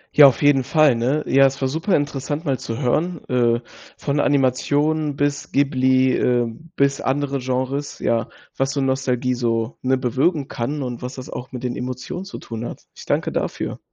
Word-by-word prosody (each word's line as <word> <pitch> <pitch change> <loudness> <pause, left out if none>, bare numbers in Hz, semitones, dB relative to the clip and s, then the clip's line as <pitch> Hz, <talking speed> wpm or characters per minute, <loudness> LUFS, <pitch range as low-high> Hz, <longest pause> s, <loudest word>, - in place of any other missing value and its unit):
Ja, 145 -1 +10
auf 135 +2 +1
jeden 145 -2 +5
Fall, 150 +1 +4
ne? 130 +6 0
Ja, 135 0 +5
es 135 +1 -4
war 135 - +1
super 160 +8 0
interessant, 145 +2 -2
mal 135 -2 0
zu 115 - -5
hören, 155 +7 -1
äh, 120 -1 +2 0.4
von 145 0 -1
Animationen 145 +2 +1
bis 145 0 -1
Ghibli, 130 -2 +3
äh, 120 -1 +2 0.3
bis 140 0 +2
andere 140 +1 -1
Genres, 130 +3 -2
ja, 115 -1 0 0.3
was 135 +1 0
so 140 - -1
Nostalgie 130 -1 0
so, 115 -1 -1
ne, 130 0 +2
bewirken 135 +4 0
kann 140 +4 -3
und 120 -2 -5
was 125 +1 -5
das 130 - -8
auch 125 - -7
mit 125 -1 -7
den 125 -1 -2
Emotionen 130 +9 -5
zu 200 - -8
tun 115 -1 -7
hat. - - -7
Ich - - -11
danke - - 0
dafür. - - -3
135 Hz, 185 wpm, -21 LUFS, 125-145 Hz, 0.4 s, Ja